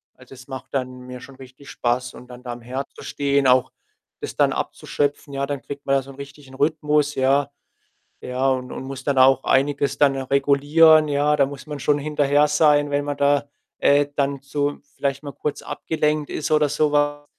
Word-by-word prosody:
Also, 130 0 -16
es 130 -1 -14
macht 130 -1 -9
dann 130 -2 -3
mir 125 0 -9
schon 135 +1 -13
richtig 130 +1 -14
Spaß 125 +1 -2
und 125 - -13
dann 125 0 -12
da 125 - -6
am 120 - -11
Herd 130 +4 -5
zu - - -11
stehen, 140 -1 0
auch 125 -1 +3 0.5
das - - -6
dann - - +3
abzuschöpfen, 145 0 -3
ja? 140 0 -1
Dann 140 -1 -4
kriegt 140 +3 -9
man 135 - +2
da 135 - +2
so 135 +1 -12
'n - - -14
richtigen 140 -1 -11
Rhythmus, 150 0 +1
ja? 135 +2 +2 0.7
Ja, 130 +2 -1
und 130 -1 -2
und - - -6
muss 135 0 -7
dann 140 -2 0
auch 130 +1 +5
einiges 140 +1 +1
dann 140 -2 +3
regulieren, 145 +4 +4
ja? 145 +1 +2
Da 140 - +3
muss 140 +2 -9
man 150 -1 -6
schon 145 +1 +1
hinterher 145 0 +2
sein, 150 -1 +3
wenn 145 0 0
man 145 - -3
da, 145 0 +2 0.3
äh, 145 0 +4
dann 140 -1 -1
zu 145 +1 -2 0.2
vielleicht 140 0 -2
mal 145 - -6
kurz 150 - -4
abgelenkt 150 -2 -2
ist 155 - -4
oder 150 -1 +4
so 150 0 +1
was. 145 0 +1
140 Hz, 205 wpm, -22 LUFS, 130-145 Hz, 0.7 s, auch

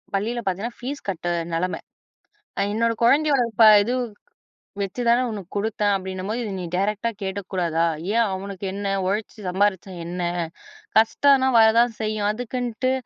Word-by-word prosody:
பள்ளியில 230 +5 -1
பார்த்தீங்கன்னா, 200 +6 -3
ஃபீஸ் 270 -1 -6
கட்ட 175 -2 -4 0.3
நிலைம. 180 +2 -1 1.0
என்னோட 230 +1 +2
குழந்தையோட 280 +1 +4 0.4
இது 245 - -1 0.9
வச்சு 200 +5 -3
தானே 240 +2 +5
உனக்கு 200 -5 -7
குடுத்தேன் 205 0 0
அப்டின்னும்போது, 190 +4 -4
இத 210 - -4
நீ - - -4
டைரக்ட்டா 210 +4 0
கேட்டுக்க 195 -1 -5
கூடாதா? 170 -3 +1 0.3
ஏன் 230 0 +4
அவனுக்கு 195 0 -6
என்ன? 200 0 -2
உழைச்சி 210 +4 -2
சம்பாரிச்சா 190 0 0
என்ன? 175 +1 -4 0.8
கஷ்டம்னா 265 +4 +4
வர 220 0 +8
தான் 235 0 +4
செய்யும், 215 -1 -1
அதுக்குன்ட்டு 245 +2 -2
210 Hz, 135 wpm, -23 LUFS, 190-235 Hz, 1.0 s, வர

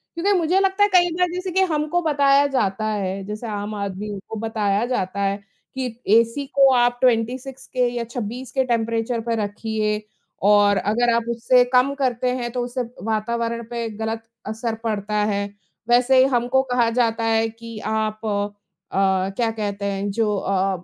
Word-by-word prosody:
क्योंकि 375 +5 +1
मुझे 350 +3 +2
लगता 390 +1 +2
है 410 - +4
कई 350 -1 +5
बार 360 - +3
जैसे 365 +1 -3
कि 380 +2 +2
हमको 305 +3 0
बताया 285 -3 +4
जाता 215 -6 0
है, 195 -2 -2
जैसे 210 +3 -6
आम 205 0 -4
आदमियों 200 0 -4
को 225 - -5
बताया 215 -1 0
जाता 200 -5 -2
है 195 0 +1 0.4
कि 265 -1 -2 0.2
एसी 230 +6 +3
को 275 -1 +6
आप 245 0 +3
26 255 +2 0
के 250 -1 +1
या 235 - -1
26 240 +2 -6
के 265 +1 +1
टेम्परेचर 230 0 0
पे 230 - +2
रखिए 210 +1 -2 0.4
और 205 -1 +5
अगर 230 +5 +1
आप 235 0 +1
उससे 240 +2 +4
कम 255 +3 +4
करते 255 -3 0
हैं 240 -1 -3
तो 245 0 -2
उससे 245 +1 -3
अ, - - -3 0.2
वातावरण 230 +2 -1
पे 235 -1 -3
गलत 225 0 -3 0.2
असर 225 +1 -3
पड़ता 210 -1 -2 0.2
है। 200 0 0 0.5
वैसे 250 +2 +5
ही 255 - +7
हमको 245 +2 +2
कहा 240 -2 +3
जाता 230 -1 +1
है 225 0 +2
कि 230 0 -10
आप 215 0 -2
अ, 195 -2 -1
क्या 230 -2 +1
कहते 205 -2 -4
हैं 200 0 -2
जो 210 -1 0
अ 195 - -2
अ, 190 -1 0
230 Hz, 180 wpm, -22 LUFS, 210-250 Hz, 0.5 s, ही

